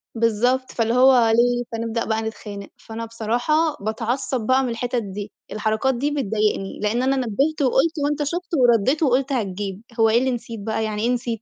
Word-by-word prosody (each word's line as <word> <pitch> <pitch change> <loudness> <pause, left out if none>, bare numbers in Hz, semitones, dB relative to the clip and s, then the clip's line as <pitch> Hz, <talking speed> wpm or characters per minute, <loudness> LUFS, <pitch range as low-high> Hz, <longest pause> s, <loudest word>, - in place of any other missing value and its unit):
بالضبط، 240 +3 +1
فاللي 230 0 0
هو 250 -2 +6
ليه، 245 +1 +3
فنبدأ 230 0 -2
بقى 220 0 0
نتخانق، 205 -3 -7
فأنا 230 0 -7
بصراحة 230 +5 -1 0.3
باتعصّب 235 +4 -2
بقى 260 +1 +4
من 250 - -1
الحِتَت 235 0 -2
دي، 200 +1 -6 0.2
الحركات 220 +5 0
دي 285 +5 -1
بتضايقني، 215 -7 -1
لإن 220 +4 0
أنا 270 +1 +2
نبِّهت 270 +5 0
وقُلت 275 +5 +3
وأنت 295 +1 0
شُفت 350 +5 -3
وردّيت 245 +5 +3
وقُلت 270 +1 +2
هتجيب، 200 -3 -3 0.2
هو 225 0 +5
إيه 225 - +4
اللي 260 0 0
نسيت 230 -2 -5
بقى، 220 +1 -2
يعني 215 -1 -2
إيه 235 - +1
نسيت؟ 235 -2 -3
235 Hz, 180 wpm, -22 LUFS, 220-260 Hz, 0.3 s, هو